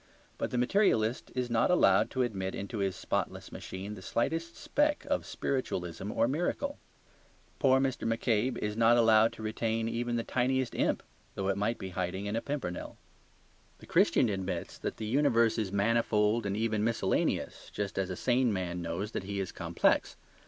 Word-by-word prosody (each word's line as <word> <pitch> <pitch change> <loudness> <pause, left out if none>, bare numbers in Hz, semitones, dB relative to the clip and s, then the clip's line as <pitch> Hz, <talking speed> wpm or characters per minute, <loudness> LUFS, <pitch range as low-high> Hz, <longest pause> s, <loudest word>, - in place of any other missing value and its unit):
But - - -1
the 125 - -2
materialist 125 - +2
is 125 -1 0
not 115 -1 +3
allowed 180 - +4
to 130 -1 0
admit 95 -5 -3
into 100 +3 -5
his 95 -1 0
spotless - - -3
machine 95 +3 -6
the 100 - -9
slightest 165 - -2
speck 295 0 +1
of - - 0
spiritualism 95 -7 -3
or - - +2
miracle. 175 - -1 0.8
Poor 130 -2 +5
Mr. 130 -4 0
McCabe 115 +2 +1
is 105 0 -2
not 115 +1 +5
allowed 110 -1 +5
to 110 - -9
retain 110 +1 -1
even 120 +1 -1
the 115 - 0
tiniest 130 0 0
imp, - - 0 0.3
though 95 0 -1
it 95 - +2
might 105 +4 0
be 95 - -6
hiding 95 +2 -3
in 105 +1 -2
a 115 - 0
pimpernel. 135 -12 -4 0.8
The - - -14
Christian - - +3
admits 95 -4 -3
that - - -4
the 110 - -4
universe 115 -2 +3
is 100 -4 -2
manifold 105 +1 +2
and 100 0 -2
even 110 -1 0
miscellaneous, 115 0 0
just 100 -1 -3
as 95 -1 -1
a 95 - -3
sane 125 +3 +2
man 90 -3 -2
knows 85 +6 -3
that 95 - -4
he 100 0 -3
is 95 - -3
complex. - - +1
115 Hz, 175 wpm, -31 LUFS, 100-125 Hz, 0.8 s, Poor